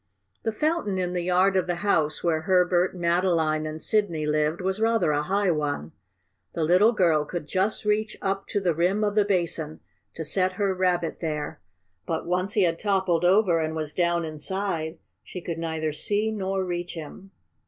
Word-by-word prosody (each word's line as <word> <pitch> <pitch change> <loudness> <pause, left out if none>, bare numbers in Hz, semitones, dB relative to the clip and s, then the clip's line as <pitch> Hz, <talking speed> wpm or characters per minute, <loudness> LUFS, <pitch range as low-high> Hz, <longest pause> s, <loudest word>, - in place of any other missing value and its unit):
The 225 - -1
fountain 300 - -1
in 180 -1 -1
the 180 - -1
yard 185 +2 +2
of 185 -1 +1
the 175 - 0
house 155 -6 +1
where 165 -2 +1
Herbert, 180 +1 +2
Madeline 170 -3 +1
and 155 +1 -6
Sidney 175 -6 +1
lived 150 +2 0
was 190 +3 -2
rather 225 -7 +2
a 145 0 +1
high 195 +4 +1
one. 145 - -2 0.6
The 165 - -1
little 180 +8 +5
girl 170 -8 +3
could 170 +1 -5
just 195 +6 -1
reach 215 +1 0
up 195 0 -2
to 205 - -1
the 180 -4 +1
rim 180 +6 +1
of 205 -1 +1
the 210 -1 +3
basin 170 -5 -1 0.4
to 160 - -4
set 185 +4 +1
her 195 0 0
Rabbit 180 -2 0
there, 155 -1 -4 0.5
but, 160 - -2
once 180 +3 -1
he 205 - +3
had 165 -1 +1
toppled 190 -5 +1
over 180 -2 +4
and 160 0 -2
was 155 -1 -3
down 170 -1 +1
inside, 160 +1 -2 0.3
she 180 - -8
could 170 -2 -5
neither 160 -1 -2
see 210 +7 0
nor 195 -2 -2
reach 175 0 -4
him. 165 +4 -9
180 Hz, 185 wpm, -25 LUFS, 160-195 Hz, 0.6 s, little